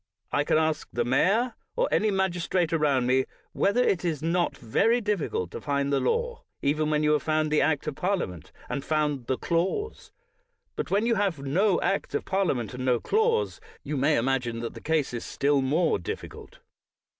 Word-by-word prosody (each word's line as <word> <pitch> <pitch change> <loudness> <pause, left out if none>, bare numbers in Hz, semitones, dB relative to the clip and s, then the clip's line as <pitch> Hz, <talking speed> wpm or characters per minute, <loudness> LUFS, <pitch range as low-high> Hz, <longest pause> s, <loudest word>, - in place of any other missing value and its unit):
I 145 - +2
can 150 - +2
ask 155 -1 0
the 120 -1 -1
mayor, 200 - +2 0.2
or - - +2
any 215 - +2
mag 190 -2 +1
istrate 175 -1 0
around 145 -5 +2
m.e, 130 +1 +2 0.3
whether 200 +6 +2
it 185 -7 +1
is 160 -4 -2
not 170 +1 0
very 225 - +2
diffi 210 -7 -1
cult 90 -1 -3
to - - -7
find 140 -1 0
the 140 - +3
law, 475 0 -1 0.2
even 150 +2 +1
when 150 0 +1
you 150 - +3
have 150 - +2
found 155 -1 0
the 155 - +3
Act 145 -1 +1
of 155 - -2
Parliament, 175 - -2 0.2
and 140 - -3
found 150 -5 -1
the 130 - 0
clause. 190 - -2 0.6
But - - -3
when 205 +3 +2
you 235 - +3
have 200 -6 0
no 175 +8 +1
Act 195 - -1
of - - -2
Parliament, 175 - 0
and 125 +1 -5
no 125 -2 +2
clause, 455 - +1 0.2
you 150 - -3
may 145 +3 +2
imagine 120 -1 0
that 115 - -4
the - - -10
case 155 -5 0
is 120 - -4
still 140 0 +1
more 155 +6 +1
difficult. 85 - -8
155 Hz, 195 wpm, -27 LUFS, 135-195 Hz, 0.6 s, the